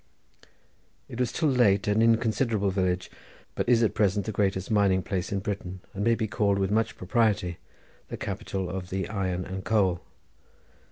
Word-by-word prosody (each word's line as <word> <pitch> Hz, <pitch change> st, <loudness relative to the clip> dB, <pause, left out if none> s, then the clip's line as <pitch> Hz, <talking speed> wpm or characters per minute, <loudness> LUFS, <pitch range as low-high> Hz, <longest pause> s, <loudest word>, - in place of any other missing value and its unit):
It 120 Hz, -, -8 dB
was 125 Hz, -, +1 dB
till 160 Hz, -, 0 dB
late 105 Hz, -7 st, +3 dB
an 105 Hz, +2 st, +3 dB
inconsiderable 115 Hz, -2 st, +2 dB
village, 90 Hz, -1 st, -1 dB, 0.4 s
but -, -, -2 dB
is 120 Hz, -1 st, +5 dB
at 110 Hz, -, +2 dB
present 100 Hz, -1 st, +1 dB
the 110 Hz, -, -2 dB
greatest 95 Hz, -1 st, -1 dB
mining 100 Hz, -3 st, +3 dB
place 95 Hz, -2 st, -3 dB
in 100 Hz, -1 st, -1 dB
Britain, 95 Hz, -2 st, -4 dB
and 100 Hz, -, -3 dB
may 115 Hz, +1 st, +3 dB
be 110 Hz, -1 st, -2 dB
called 100 Hz, -1 st, +1 dB
with 95 Hz, 0 st, 0 dB
much 110 Hz, +1 st, 0 dB
propriety 95 Hz, -4 st, 0 dB, 0.5 s
the -, -, -6 dB
capital 95 Hz, -1 st, -4 dB
of 90 Hz, 0 st, -5 dB
the 95 Hz, +1 st, -2 dB
iron 95 Hz, -4 st, -2 dB
and 95 Hz, 0 st, -6 dB
coal. 95 Hz, -5 st, +1 dB
100 Hz, 170 wpm, -27 LUFS, 95-110 Hz, 0.5 s, is